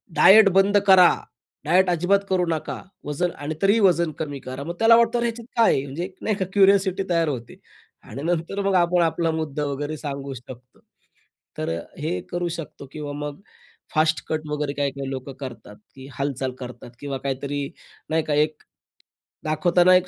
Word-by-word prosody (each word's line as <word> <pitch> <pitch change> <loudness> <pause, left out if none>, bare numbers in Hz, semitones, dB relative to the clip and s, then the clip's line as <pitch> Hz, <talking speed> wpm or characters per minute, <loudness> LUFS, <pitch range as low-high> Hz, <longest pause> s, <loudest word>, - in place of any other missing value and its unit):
"Diet 210 0 +8
बंद 200 +1 +5
करा, 185 -2 +8 0.5
diet 180 +4 +4
अजिबात 180 +3 +3
करू 185 -2 +2
नका, 160 -2 -3 0.2
वजन 170 +4 -1
आणि 150 +2 -5
तरीही 200 +3 +4
वजन 170 -5 +3
कमी 145 -3 -4
करा." 130 +2 -5
मग 170 +4 -5
त्याला 225 +1 +7
वाटतं, 235 +1 +3
अरे, 235 - +1
ह्याच्यात 235 0 -6
काय 230 - +5
आहे? 135 - 0
म्हणजे 145 +5 -5
एक 185 - -11
नाही 215 - 0
का, 190 - -2
क्युरिओसिटी 195 -1 +4
तयार 165 -1 +2
होते. 120 -5 -6 0.4
आणि 135 +6 -8
नंतर 175 +4 -1
मग 195 -1 +2
आपण 175 0 +3
आपला 165 0 +1
मुद्दा 155 -2 -3
वगैरे 145 +2 -3
सांगू 140 -2 -5
शकतो. 125 0 -12 0.8
तर - - -2
अ, - - -7 0.2
हे 160 +4 -2
करू 175 0 -1
शकतो. 145 -2 -9
किंवा 150 -2 -5
मग 145 0 -5 0.6
फास्ट 155 +1 +2
कट 155 -1 -1
वगैरे 150 -1 -2
काही-काही 140 -1 -2
लोक 130 0 -5
करतात, 125 -6 -8 0.2
की 135 0 -11
हालचाल 135 -2 -2
करतात. 120 -1 -9
किंवा 140 -2 -4
काहीतरी 140 +1 -3 0.4
नाही 160 0 +1
का, 150 - -2
एक 150 +1 +1 0.8
दाखवताना 175 +4 +4
एक 180 0 +3
155 Hz, 175 wpm, -23 LUFS, 140-185 Hz, 0.8 s, Diet